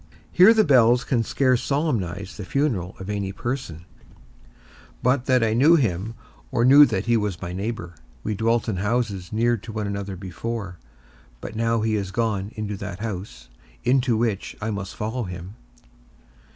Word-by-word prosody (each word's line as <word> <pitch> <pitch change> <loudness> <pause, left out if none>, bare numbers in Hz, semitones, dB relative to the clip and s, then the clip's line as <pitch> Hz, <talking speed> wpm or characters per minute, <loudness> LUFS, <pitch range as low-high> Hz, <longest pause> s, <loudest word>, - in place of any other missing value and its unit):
Here 185 +5 +7
the 220 -1 +5
bells 125 - +5
can 115 +2 +1
scarce 130 +2 +1
solemnize 105 - -2
the 100 - -7
funeral 110 - -1
of 95 - -7
any 100 -2 -2
person, 100 - -5 1.2
but 125 0 +2
that 125 -2 +4
I 110 -1 +2
knew 145 +9 +6
him, 110 - -1 0.4
or 115 - +2
knew 140 +3 +8
that 95 - -2
he 120 0 +3
was 105 -5 -1
my 90 -1 -5
neighbour: 100 -2 -4 0.3
we 110 - -1
dwelt 115 +2 +1
in 105 -5 -1
houses 105 -3 -1
near 120 +2 +2
to 110 +2 -9
one 105 -1 -3
another 100 -1 -4
before, 95 0 -5 0.6
but 100 - -8
now 115 0 +1
he 110 0 +1
is 100 -3 -2
gone 105 -2 -1
into 105 -1 -4
that 95 -1 -6
house 90 - -6 0.4
into 125 -2 +2
which 110 -4 -1
I 110 +1 -2
must 100 -2 -5
follow 110 +3 -3
him. 90 +1 -8
110 Hz, 165 wpm, -24 LUFS, 95-120 Hz, 1.2 s, knew